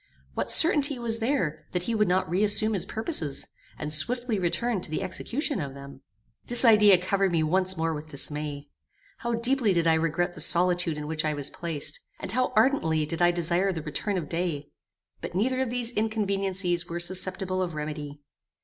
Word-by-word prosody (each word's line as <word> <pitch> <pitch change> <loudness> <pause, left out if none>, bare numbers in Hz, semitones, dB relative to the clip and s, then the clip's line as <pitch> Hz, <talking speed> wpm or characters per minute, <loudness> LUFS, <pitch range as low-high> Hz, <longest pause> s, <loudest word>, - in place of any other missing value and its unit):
What - - -3
certainty 295 -4 +5
was 230 -1 -1
there, 225 - -2
that 180 -1 -1
he 230 - -2
would 210 -2 +2
not 185 +1 +1
re 180 +5 0
assume 215 +1 +3
his 195 - 0
purposes, 220 - -2 0.3
and 150 0 -2
swiftly 240 - +1
return 195 +4 -1
to - - -9
the 155 - -3
execution 275 - -2
of 140 -2 -6
them? 140 -1 -11 0.5
This 245 +1 +6
idea 210 -4 +7
covered 190 +1 0
me 165 -2 +1
once 185 +3 +3
more 165 0 -1
with 155 +1 -8
dismay. 145 0 -5 0.5
How 235 0 -2
deeply 235 -2 +1
did 170 -1 +1
I 165 - +4
regret 165 +2 0
the 155 - -8
solitude 175 -1 +1
in 150 - -5
which 155 0 -3
I 155 -1 -1
was 145 -1 -4
placed, 155 -3 -2 0.2
and - - -4
how 255 +2 0
ardently 215 - +2
did 165 +3 -3
I 175 - +5
desire 175 +2 0
the 160 -4 -5
return 175 +6 -3
of 165 -5 -4
day! 165 -4 -3 0.5
But - - -7
neither 255 +7 0
of 260 - -1
these 245 -1 0
inconveniencies 195 -5 0
were 170 +1 -5
susceptible 185 +1 0
of 175 -3 -3
remedy. 150 -1 -6
180 Hz, 190 wpm, -26 LUFS, 155-220 Hz, 0.5 s, idea